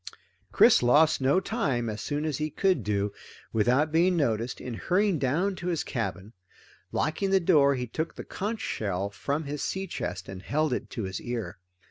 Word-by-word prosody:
Chris -, -, +6 dB
lost 150 Hz, +5 st, +4 dB
no 135 Hz, +7 st, +4 dB
time, 145 Hz, -, -1 dB
as 110 Hz, -1 st, -4 dB
soon 150 Hz, +1 st, -2 dB
as 155 Hz, -2 st, -2 dB
he 155 Hz, 0 st, -1 dB
could 185 Hz, -, +1 dB
do 100 Hz, 0 st, 0 dB
it 105 Hz, -, -4 dB, 0.4 s
without 125 Hz, +8 st, +2 dB
being 175 Hz, +3 st, +3 dB
noticed, 115 Hz, -5 st, 0 dB
in 125 Hz, -, -6 dB
hurrying 185 Hz, -, +1 dB
down 165 Hz, +10 st, +1 dB
to 175 Hz, -, -6 dB
his 170 Hz, -3 st, 0 dB
cabin. 110 Hz, -4 st, -4 dB, 0.6 s
Locking 175 Hz, +5 st, 0 dB
the 195 Hz, 0 st, +4 dB
door, 150 Hz, -6 st, +4 dB
he 125 Hz, -1 st, -2 dB
took 160 Hz, +8 st, -4 dB
the -, -, -7 dB
conch 215 Hz, +3 st, -4 dB
shell 100 Hz, -1 st, -2 dB
from 145 Hz, +9 st, -2 dB
his 145 Hz, 0 st, -5 dB
sea 190 Hz, 0 st, -2 dB
chest 90 Hz, -, -5 dB
and 95 Hz, -1 st, -7 dB
held 145 Hz, +7 st, 0 dB
it -, -, -3 dB
to 115 Hz, -, -4 dB
his 95 Hz, 0 st, -4 dB
ear. 115 Hz, -8 st, -5 dB
140 Hz, 190 wpm, -27 LUFS, 110-170 Hz, 0.6 s, Chris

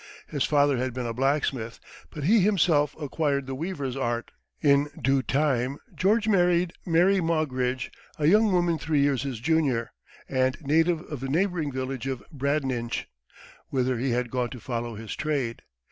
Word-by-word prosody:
His 145 Hz, -4 st, -2 dB
father 145 Hz, -2 st, +3 dB
had 125 Hz, 0 st, -2 dB
been 125 Hz, -1 st, -3 dB
a 115 Hz, -, -2 dB
blacksmith; 130 Hz, -3 st, -1 dB, 0.3 s
but 150 Hz, -, -7 dB
he 215 Hz, +9 st, +5 dB
himself 170 Hz, -7 st, +3 dB
acquired 145 Hz, -2 st, -1 dB
the 135 Hz, -, -5 dB
weaver's 140 Hz, -3 st, -3 dB
art. 120 Hz, -3 st, -2 dB, 0.3 s
In 140 Hz, 0 st, +3 dB
due 135 Hz, +1 st, +2 dB
time 135 Hz, -1 st, 0 dB, 0.2 s
George 210 Hz, +3 st, +2 dB
married 180 Hz, -3 st, +3 dB
Mary 180 Hz, +3 st, +4 dB
Maugridge, 130 Hz, -6 st, -1 dB, 0.3 s
a 150 Hz, -, 0 dB
young 210 Hz, +6 st, +5 dB
woman 175 Hz, -3 st, +2 dB
three 150 Hz, -3 st, +1 dB
years 140 Hz, -3 st, +2 dB
his 135 Hz, -5 st, -4 dB
junior, 140 Hz, -4 st, +1 dB, 0.4 s
and 130 Hz, 0 st, +1 dB
native 160 Hz, +2 st, +2 dB
of 150 Hz, -, -7 dB
the 135 Hz, +1 st, -4 dB
neighboring 170 Hz, -1 st, 0 dB
village 130 Hz, -1 st, -4 dB
of 130 Hz, -2 st, -3 dB
Bradninch, 135 Hz, -5 st, -1 dB, 0.6 s
whither 130 Hz, -2 st, 0 dB
he 130 Hz, +2 st, 0 dB
had 120 Hz, 0 st, -1 dB
gone 125 Hz, -2 st, -1 dB
to 125 Hz, -, -8 dB
follow 120 Hz, 0 st, -4 dB
his 110 Hz, 0 st, -6 dB
trade. 140 Hz, -7 st, -2 dB
140 Hz, 160 wpm, -26 LUFS, 130-160 Hz, 0.6 s, he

